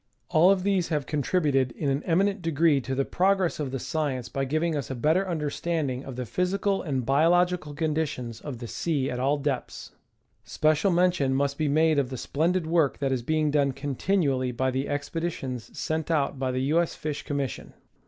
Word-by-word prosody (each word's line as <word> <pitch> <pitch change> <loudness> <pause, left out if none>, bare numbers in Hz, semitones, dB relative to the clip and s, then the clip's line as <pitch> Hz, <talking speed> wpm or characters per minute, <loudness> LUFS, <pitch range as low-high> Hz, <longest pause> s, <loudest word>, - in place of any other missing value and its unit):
All 165 +4 +5
of 195 -2 +3
these 195 -3 +1
have 150 -4 -1
contributed 140 -3 +1
in 145 - -3
an 135 +2 0
eminent 195 +3 +2
degree 160 -3 +2
to 130 +1 -3
the 135 +1 0
progress 190 -2 +1
of 145 -3 -2
the 135 - -3
science 135 -3 -2
by 135 0 -2
giving 155 +4 0
us 140 -5 -3
a 130 - -3
better 160 +9 +1
understanding 150 -4 -2
of 135 - -7
the 125 0 -4
physical 195 - 0
and 135 -7 -2
biological 165 +2 +2
conditions 150 -7 -2
of 140 -5 -6
the 120 0 -7
sea 140 0 -1
at 125 - -3
all 140 +3 +2
depths. 140 -3 -4 0.5
Special 155 +5 +2
mention 175 -7 +2
must 140 +1 0
be 155 +1 -1
made 155 +1 +3
of 135 -3 0
the 130 - -5
splendid 165 +8 0
work 160 -3 +2
that 135 -1 -1
is 130 -2 0
being 155 +3 +1
done 140 -2 +2
continually 135 -1 0
by 130 +2 0
the 130 +2 -2
expeditions 145 -4 -3
sent 160 0 -2
out 145 -4 0
by 130 -1 0
the 130 +3 -1
TJ. 165 +2 +4
S. 170 - -3
Fish 150 -1 -4
Commission. 140 -4 -4
150 Hz, 190 wpm, -26 LUFS, 135-165 Hz, 0.5 s, All